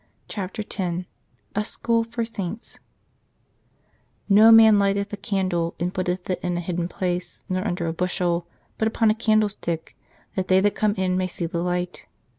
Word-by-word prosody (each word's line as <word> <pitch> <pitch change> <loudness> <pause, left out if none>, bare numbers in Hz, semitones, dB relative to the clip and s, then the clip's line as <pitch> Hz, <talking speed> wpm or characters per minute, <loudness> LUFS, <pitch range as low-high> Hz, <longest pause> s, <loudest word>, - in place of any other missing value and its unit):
CHAPTER 205 +2 -4
X 180 -3 -3 0.5
A 210 - 0
SCHOOL 230 +1 0
FOR 230 0 -3
SAINTS 210 -1 -5 0.7
" - - -43 0.7
No 215 +3 +8
man 220 -2 +8
lighteth 200 +1 0
a - - 0
candle, 190 -5 -1
and 180 +2 -1
putteth 180 0 -2
it 185 - -1
in 175 -1 -1
a - - -1
hidden 175 0 -2
place, 180 -1 -3
nor 185 +3 -1
under 175 -2 -2
a 165 - -1
bushel: 175 -1 -1 0.3
but 220 - +2
upon 225 0 +3
a - - +3
candlestick, 215 -7 0 0.4
that 190 -1 -2
they 185 0 +5
that 205 +1 +2
come 210 -1 +1
in 185 -2 0
may 185 0 0
see 175 -1 -4
the 170 0 -2
light. 180 0 -3
185 Hz, 175 wpm, -24 LUFS, 180-210 Hz, 0.7 s, No